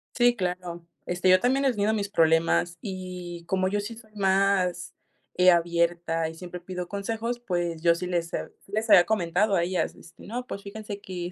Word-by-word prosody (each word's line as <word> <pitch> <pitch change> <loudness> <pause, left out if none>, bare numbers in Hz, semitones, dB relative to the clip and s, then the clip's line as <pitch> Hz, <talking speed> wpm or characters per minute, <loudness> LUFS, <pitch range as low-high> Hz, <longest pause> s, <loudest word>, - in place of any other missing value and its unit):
Sí, 245 0 +4
claro, 180 -3 -4 0.2
este, 180 +1 0
yo 185 0 +7
también 265 +5 +2
he 265 - +4
tenido 210 -2 +1
mis 205 -2 -1
problemas, 165 -1 +2
y, 180 -4 -6
como 185 0 +1
yo 205 +2 0
sí 205 +3 -5
soy 220 -2 -16
más, 190 -3 +1 0.4
eh, 180 0 +6
abierta, 170 -1 +1
y 160 - -10
siempre 180 +1 -8
pido 180 0 -6
consejos, 225 +4 -3
pues, 175 -7 -2
yo 170 0 +4
sí 175 - -4
les 175 -1 -2
he - - -3
sí - - -21
les 215 +2 -1
había 175 - +8
comentado 195 0 +1
a 170 - +2
ellas, 180 +1 -1
este, - - -15
no, 245 +4 -4
pues, 200 - -6
fíjense 205 0 -7
que, 180 -2 -5
185 Hz, 195 wpm, -26 LUFS, 175-205 Hz, 0.4 s, había